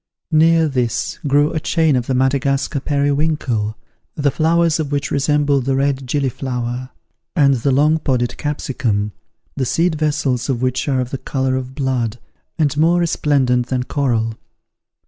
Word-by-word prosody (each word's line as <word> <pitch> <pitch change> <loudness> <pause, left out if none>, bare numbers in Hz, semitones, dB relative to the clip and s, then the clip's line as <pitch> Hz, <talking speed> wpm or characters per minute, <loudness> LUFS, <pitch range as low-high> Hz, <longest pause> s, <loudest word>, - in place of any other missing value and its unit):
Near 165 +1 +4
this 125 -5 -2
grew 145 +2 +3
a 160 - 0
chain 160 -2 +2
of 125 -1 -1
the 130 - 0
Madagascar 135 +2 +1
periwinkle, 140 -6 0 0.4
the 145 -2 +1
flowers 165 +2 +2
of 150 -2 -2
which 145 +1 -1
resemble 145 0 +2
the 135 +1 0
red 135 -1 0
gilliflower; 130 -2 -2 0.5
and 140 -4 +4
the 130 +2 0
long 150 +4 +3
podded 125 -5 -1
capsicum, 120 -8 -2 0.4
the 135 - -1
seed 165 +7 +1
vessels 145 -5 -1
of 125 -3 0
which 130 +2 -1
are 130 -2 +1
of 125 - -5
the 135 - -3
colour 130 -1 -1
of 130 0 -5
blood, 125 -5 -1 0.4
and 150 -4 +1
more 170 +3 +3
resplendent 135 -7 +1
than 125 -1 -1
coral. 120 -5 0
140 Hz, 150 wpm, -19 LUFS, 125-150 Hz, 0.5 s, Near